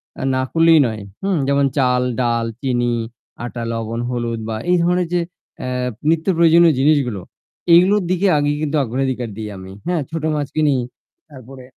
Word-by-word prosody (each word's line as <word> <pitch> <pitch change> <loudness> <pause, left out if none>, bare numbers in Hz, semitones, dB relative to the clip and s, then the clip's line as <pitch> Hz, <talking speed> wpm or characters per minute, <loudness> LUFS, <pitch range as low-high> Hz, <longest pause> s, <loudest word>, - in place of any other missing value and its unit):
অ্যা - - -6
না 130 - +1
করলেই 165 -1 +5
নয়, 110 -2 -5 0.2
হুম? 195 -3 +1
যেমন 140 0 +2
চাল, 125 -2 +2 0.2
ডাল, 115 -1 0 0.2
চিনি, 120 -3 0 0.5
আটা, 120 0 -5
লবণ, 115 0 -4
হলুদ 120 -2 -3
বা 110 - -2 0.2
এই 180 - +4
ধরনের 180 0 +1
যে 175 - +2 0.4
অ্যা 125 - -4 0.4
নিত্য 165 +1 +1
প্রয়োজনীয় 170 -1 +5
জিনিসগুলো 135 -9 +2 0.5
এইগুলোর 190 +3 +5
দিকে 185 +2 +1
আগে 145 0 +1
কিন্তু 155 0 -1
অগ্রাধিকার 125 -1 -2
দিই 110 -1 -5
আমি, 95 0 -10 0.2
হ্যাঁ? 175 -4 0
ছোটো 160 -1 -3
মাছ 145 -2 -2
কিনি 150 -3 +3 0.5
তারপরে 130 -1 -12
140 Hz, 165 wpm, -19 LUFS, 120-165 Hz, 0.5 s, করলেই